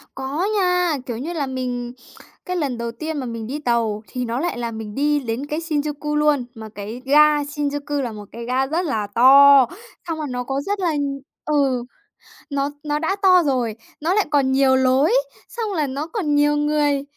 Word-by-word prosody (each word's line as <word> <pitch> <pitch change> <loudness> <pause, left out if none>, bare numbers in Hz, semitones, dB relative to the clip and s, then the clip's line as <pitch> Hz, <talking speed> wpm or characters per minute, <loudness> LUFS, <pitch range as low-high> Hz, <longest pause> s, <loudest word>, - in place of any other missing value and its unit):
Có 270 +6 -2
nha, 360 -4 +2
kiểu 240 - -4
như 315 +7 -4
là, 295 -5 -2
mình 250 -2 -4 0.5
cái 365 0 -3
lần 275 -7 -2
đầu 235 0 -3
tiên 310 +5 -5
mà 260 - -3
mình 230 -2 -5
đi 280 +5 -4
tàu 230 -5 0
thì 250 -1 -4
nó 235 +3 -2
lại 345 -7 -2
là 235 -1 -3
mình 220 -2 -7
đi 295 +2 +1
đến 250 +2 -4
cái 300 +2 -3
Shinjuku 300 -2 -2
luôn. 300 -3 +2
Mà 220 -2 -9
cái 215 +5 -7
ga 295 +2 +5
Shinjuku 290 0 -3
là 235 -3 -3
một 210 -1 -9
cái 235 - -7
ga 255 +2 0
rất 320 +6 -1
là 215 -7 -1
to, 275 +2 +8 0.4
xong 325 -1 -2
rồi 305 - -3
nó 250 0 -3
có 270 +2 -2
rất 400 +6 -3
là 345 -3 +1 0.5
ừ, 275 -5 +1 0.7
nó 280 0 -1
nó 295 0 -1
đã 335 +5 0
to 365 -2 +6
rồi, 250 -6 0 0.3
nó 330 +4 +1
lại 420 0 +2
còn 275 -2 +2
nhiều 265 0 +4
lối, 260 - +3 0.4
xong 445 -3 -3
là 305 -5 0
nó 280 +4 -4
còn 330 -6 -1
nhiều 295 0 +3
người. 295 -1 +1
280 Hz, 205 wpm, -21 LUFS, 250-300 Hz, 0.7 s, to